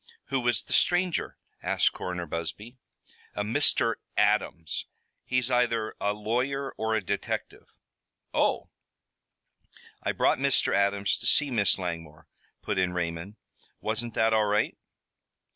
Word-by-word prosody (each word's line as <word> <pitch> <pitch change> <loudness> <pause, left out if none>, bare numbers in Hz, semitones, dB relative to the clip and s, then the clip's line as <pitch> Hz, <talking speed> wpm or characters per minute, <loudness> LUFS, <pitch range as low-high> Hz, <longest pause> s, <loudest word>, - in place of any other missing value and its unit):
"Who 135 -1 +1
was 120 -4 +1
the - - -5
stranger?" 175 -1 +2 0.2
asked - - +2
Coroner 90 -1 -4
Busby. 85 - -5 0.6
"A 105 - -1
Mr. 115 0 +2 0.2
Adams. 105 -6 +1 0.4
He's 125 0 +1
either 115 -3 +1
a 100 - +2
lawyer 125 +6 -1
or 110 0 -1
a 110 - 0
detective." - - -3 0.7
"Oh!" - - +1 1.3
"I - - 0
brought - - +2
Mr. - - +2
Adams 100 0 +2
to - - -5
see 145 -2 +3
Miss 105 -6 +3
Langmore," 80 -4 -5 0.4
put 100 - -1
in 90 -1 +1
Raymond. 85 +3 -3 0.4
"Wasn't 110 +1 -3
that 110 0 +3
all 110 -1 +4
right?" 105 +1 +1
105 Hz, 125 wpm, -28 LUFS, 90-120 Hz, 1.3 s, all